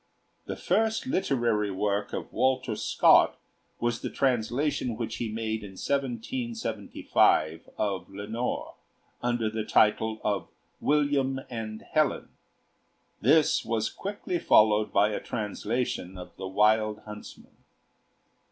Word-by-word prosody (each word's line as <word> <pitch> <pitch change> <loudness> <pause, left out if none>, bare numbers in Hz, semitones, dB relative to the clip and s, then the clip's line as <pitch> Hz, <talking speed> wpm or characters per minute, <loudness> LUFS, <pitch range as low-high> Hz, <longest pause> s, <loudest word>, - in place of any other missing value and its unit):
The - - -3
first 220 +1 +1
literary 120 - +1
work 100 +1 -1
of - - -5
Walter 130 -3 +1
Scott - - +4 0.4
was 120 0 -1
the - - -3
translation 125 0 0
which 115 -2 -4
he 115 -2 -3
made 110 0 -2
in 100 -2 -9
1775 120 - 0
of 100 -3 -2
'Lenore,' 105 +5 -4 0.5
under 120 -2 0
the 110 0 -2
title 110 +1 +2
of 105 -1 -1 0.3
'William 140 -2 +1
and 110 -2 -5
Helen'; 155 -3 0 0.9
this 150 +5 +4
was 110 -1 -1
quickly 195 -3 -4
followed 105 -4 +4
by 105 +1 +4
a 105 - -2
translation 105 -3 -3
of 90 - -10
'The 95 - -6
Wild 105 +2 +2
Huntsman.' 105 0 -11
110 Hz, 115 wpm, -28 LUFS, 105-130 Hz, 0.9 s, Scott